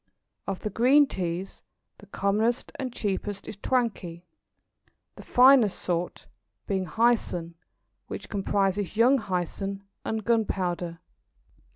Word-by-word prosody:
Of 195 -1 -3
the 210 - -3
green 270 +5 +5
Teas, 185 -5 -4 0.4
the 205 - -15
commonest 215 +5 0
and 260 -2 -3
cheapest 205 -2 -3
is - - -6
Twankay, 200 -7 -2 0.9
the - - -11
finest 250 -5 +5
sort 175 0 -3 0.4
being 190 -3 -1
Hyson, 215 -6 +1 0.5
which - - -7
comprises 200 0 -1
Young 255 +4 +5
Hyson 195 0 -3 0.2
and 220 -2 -3
Gunpowder. 180 -7 0
200 Hz, 105 wpm, -27 LUFS, 185-230 Hz, 0.9 s, green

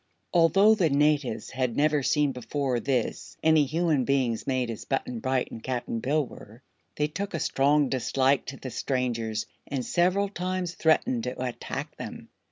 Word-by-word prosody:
Although 195 +5 +6
the 185 -7 +2
natives 140 -5 +1
had 130 -3 -1
never 150 0 +3
seen 145 +1 +2
before 125 +1 -2
this 125 -1 -2
any 160 -2 +5
human 155 -1 +1
beings 130 -4 0
made 130 -3 0
as 115 - -7
Button 125 -3 -2
Bright 130 +1 -1
and 115 - -8
Cap'n 120 -2 -3
Bill 145 +4 +1
were, 115 +1 -13 0.3
they 150 - +1
took 195 +5 -4
a - - -1
strong 145 +1 +3
dislike 135 +1 +1
to 135 - -6
the 130 - -7
strangers 115 -3 -1 0.2
and 135 -3 -3
several 185 +3 +2
times 185 -2 -3
threatened 155 -8 +2
to 125 +1 -4
attack 125 -2 -5
them. - - -8
135 Hz, 165 wpm, -27 LUFS, 125-155 Hz, 0.3 s, Although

